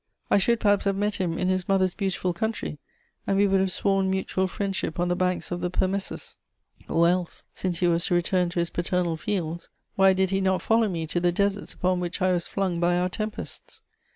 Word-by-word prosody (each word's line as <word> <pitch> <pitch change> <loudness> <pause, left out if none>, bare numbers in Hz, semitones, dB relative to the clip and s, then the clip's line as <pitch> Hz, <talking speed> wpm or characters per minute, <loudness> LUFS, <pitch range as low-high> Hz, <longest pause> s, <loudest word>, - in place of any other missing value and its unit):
I - - +6
should 235 +4 +2
perhaps 205 -2 +2
have 195 -1 +1
met 205 +1 0
him 175 -4 -1
in 185 - 0
his 185 0 -1
mother's 190 -2 +2
beautiful 185 -3 -1
country, 215 -5 -3 0.5
and 195 - +2
we 200 - +5
would 195 -1 +3
have 190 0 +1
sworn 195 0 +1
mutual 190 0 0
friendship 190 -3 -3
on 175 0 +1
the 175 - +1
banks 180 0 -1
of 175 0 -3
the 180 - -1
Permessus; 190 +2 -2 0.5
or 170 +1 +4
else, 180 0 -1
since 180 -2 -3
he 175 - +4
was 170 0 +2
to 175 - +1
return 175 0 +1
to 175 - -3
his 170 0 -1
paternal 175 -1 0
fields, 170 -2 -3 0.3
why 195 0 +5
did 190 0 +1
he 195 0 +1
not 190 -1 +1
follow 225 -1 +3
me 165 -3 -3
to 165 +3 -1
the 175 0 +2
deserts 200 +2 -1
upon 185 0 +1
which 175 +1 -3
I 185 -1 +2
was 175 -2 -1
flung 185 -3 -1
by 175 +1 +2
our 180 +1 +1
tempests! 215 +3 -7
185 Hz, 220 wpm, -26 LUFS, 175-195 Hz, 0.5 s, I